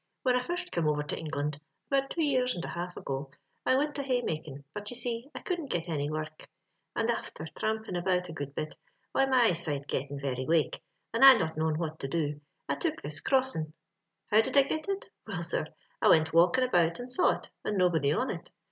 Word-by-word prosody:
Whin 255 -1 +3
I 250 - +2
first 355 +6 -3
come 165 -2 +1
over 150 -1 +1
to 150 - -3
England 150 -2 -3 0.3
(about 275 0 +2
two 330 - -1
years 255 -3 +2
and 175 - -4
a - - -5
half 175 +1 -5
ago), 135 0 -4 0.4
I 260 - +5
wint 290 +1 0
a - - +1
haymakin', 160 - -2
but, 210 0 -5
you 245 - -5
see, 235 +2 -1
I - - -5
couldn't 345 -6 -3
get 170 -5 -1
any 145 -3 -1
work; 155 0 -5 0.5
and 225 - +1
afther 230 -9 -3
thrampin' 220 +3 -3
about 180 0 +1
a 165 - -7
good 145 -2 -6
bit, 155 - -4 0.4
why 270 - +3
my 260 -2 +5
eyesight 165 -9 +1
gettin' 140 +1 -3
very 130 -2 -2
wake, 160 -2 +2 0.3
and 230 - +2
I 270 -1 +12
not 160 -8 -1
knowin' 155 0 0
what 160 -1 -3
to 135 - -3
do, 150 -1 -1 0.3
I 140 - +1
took 140 - -2
this 145 +1 -3
crossin*. 260 - +1 0.3
«* 165 +1 -44
How 215 +1 +7
did 225 - -1
I 275 - +8
get 310 +6 -3
it 390 0 -2
?— - - -33
Will, - - -3
sir, - - 0 0.3
I - - +4
wint 160 0 +5
walkin' 180 +10 +5
about 175 -8 +2
and 245 +1 -5
saw 360 - +4
it, - - -12
and 210 - -1
nobody 165 -6 +3
on - - +1
it. - - -8
175 Hz, 225 wpm, -30 LUFS, 155-255 Hz, 0.5 s, I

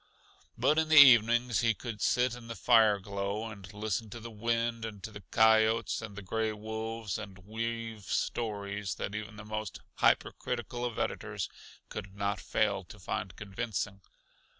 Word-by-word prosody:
But 155 +2 +3
in 160 0 0
the 155 - +6
evenings 120 -3 +7
he 115 -2 +2
could 110 -1 -6
sit 125 +3 +2
in 120 -1 -9
the 115 - -5
fire 110 -4 +5
glow 100 +2 -3
and 95 -3 -10
listen 105 +1 -3
to 115 - -8
the 115 +1 -8
wind 115 +1 -1
and 105 -4 -6
to 110 - -6
the 105 -1 -9
coyotes 110 0 +4
and 110 -3 -8
the 105 - -7
gray 110 +3 -1
wolves, 110 0 -4
and 100 -3 -8
weave 115 -1 -4
stories 100 -3 -2
that 100 - -4
even 110 +1 -5
the 105 0 -9
most 110 -2 -4 0.2
hyper - - +3
critical 120 0 -4
of 120 -3 -4
editors - - -2 0.4
could 95 +1 -7
not 100 0 -1
fail 100 -3 0
to 105 - -12
find 90 -1 -4
convincing. 105 -1 -4
110 Hz, 170 wpm, -31 LUFS, 100-115 Hz, 0.4 s, evenings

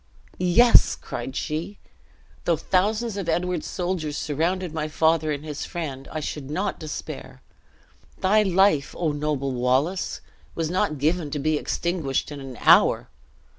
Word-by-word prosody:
"Yes," 185 +7 +6
cried 125 +2 -6
she, 165 +7 -3 0.7
"though 170 -2 +2
thousands 210 +6 0
of 190 -4 -3
Edward's 175 0 -1
soldiers 175 -5 -2
surrounded 170 +4 -1
my 155 -1 -2
father 160 0 +2
and 145 +1 -4
his 150 -2 -5
friend, 140 -6 -5
I 155 - -3
should 145 -2 -5
not 190 +6 -2
despair. 155 -2 -7 0.8
Thy 210 +3 +4
life, 190 -7 +3
O 165 -3 0
noble 145 -2 -1
Wallace, 130 +9 0 0.4
was 165 -1 -2
not 165 -4 0
give 155 +2 0
to 145 - -3
be 155 +2 +1
extinguished 155 -3 -1
in 145 - -6
an 135 -2 -8
hour! - - +5
160 Hz, 140 wpm, -24 LUFS, 145-180 Hz, 0.8 s, Yes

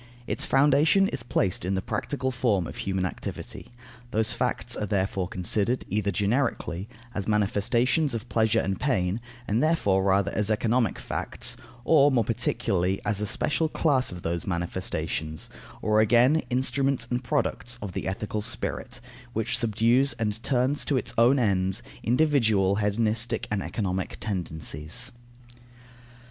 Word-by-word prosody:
Its - - +1
foundation 145 +8 +4
is - - -3
placed 95 -6 0
in 95 +2 -1
the - - 0
practical 130 +4 -2
form 115 -8 +1
of - - -8
human 95 -1 -1
activity. 90 - -6 0.4
Those 110 -2 +1
facts - - -1
are 105 - -3
therefore 95 -2 0
considered, 100 +7 0
either 105 +1 0
generically, 105 -3 -1 0.2
as 100 - -3
manifestations 115 +7 +1
of 115 +1 -5
pleasure 110 -2 +2
and 95 0 -2
pain, 95 -7 0 0.3
and 110 +3 +1
therefore 145 -12 +2
rather 100 +1 +2
as 105 +1 0
economic 115 +2 +1
facts; - - -1 0.3
or, 145 -3 +6
more 120 -3 +3
particularly, 100 -4 0
as 105 0 0
a 105 - -1
special 155 +9 0
class 140 -7 +1
of 90 -1 -8
those 85 +2 -2
manifestations; 80 -3 -3 0.3
or 110 0 +4
again, 120 +7 +5
as - - 0
instruments 135 0 +1
and 125 +1 -1
products 120 0 -1
of 100 -4 -5
the - - -3
ethical 105 +3 -3
spirit, 105 - -4 0.3
which 110 0 -1
subdues 120 +4 +3
and 110 -1 -3
turns 130 +3 +1
to 140 - +1
its 120 -1 -2
own 120 +4 +5
ends 100 -2 0 0.2
individual 115 -8 +2
hedonistic 110 +2 0
and 105 -2 0
economic 95 -3 -3
tendencies. 85 - -3
110 Hz, 145 wpm, -26 LUFS, 95-125 Hz, 0.4 s, or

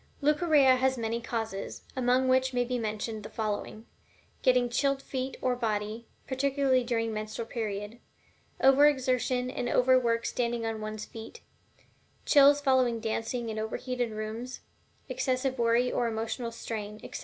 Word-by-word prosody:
Leucorrhea 295 -3 +4
has 260 0 +1
many 230 0 -2
causes, 225 -4 -4
among 255 0 +2
which 260 0 +2
may 245 - +3
be 250 0 -2
mentioned 215 0 -3
the 210 - -8
following: 215 0 -4 0.6
getting 250 -1 +3
chilled 275 +3 +1
feet 265 -1 -4
or 255 -1 +2
body, 220 -1 -3 0.2
particularly 270 -1 +1
during 230 -2 -1
the - - -4
menstrual 215 +2 -4
period; 215 -1 -4 0.6
over 270 +2 +6
exertion 255 -2 0
and 245 -1 -3
overwork 245 -3 +3
standing 235 -1 -1
on 225 -1 -3
one's 215 0 -5
feet; 225 - -10 0.8
chills 285 0 +6
following 260 -4 +2
dancing 225 +1 -3
in 220 0 -3
overheated 245 +2 -2
rooms; 220 +3 -6 0.5
excessive 260 0 -1
worry 235 +2 +3
or 240 - 0
emotional 230 +1 -3
strain, 215 -2 -6
etc. - - -7
240 Hz, 145 wpm, -29 LUFS, 225-260 Hz, 0.8 s, over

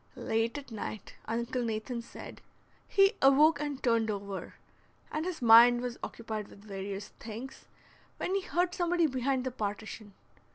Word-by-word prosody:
Late 225 +4 -1
at 280 -3 -9
night, 215 -1 -6
Uncle 235 +3 -2
Nathan 230 +1 -3
said, 235 - -11 0.5
he 390 0 +5
awoke 285 +3 +6
and 290 -2 -4
turned 230 -2 +2
over, 200 -1 -5 0.6
and 310 +2 -2
his 340 -8 -4
mind 240 +1 +8
was 245 -1 -4
occupied 220 -2 -5
with 200 - -16
various 195 0 -5
things, 235 +4 -8 0.5
when 370 - -2
he 395 - +1
heard 355 0 0
somebody 350 -2 +2
behind 260 -2 0
the 260 - -2
partition. 210 -2 -5
235 Hz, 150 wpm, -31 LUFS, 220-285 Hz, 0.6 s, mind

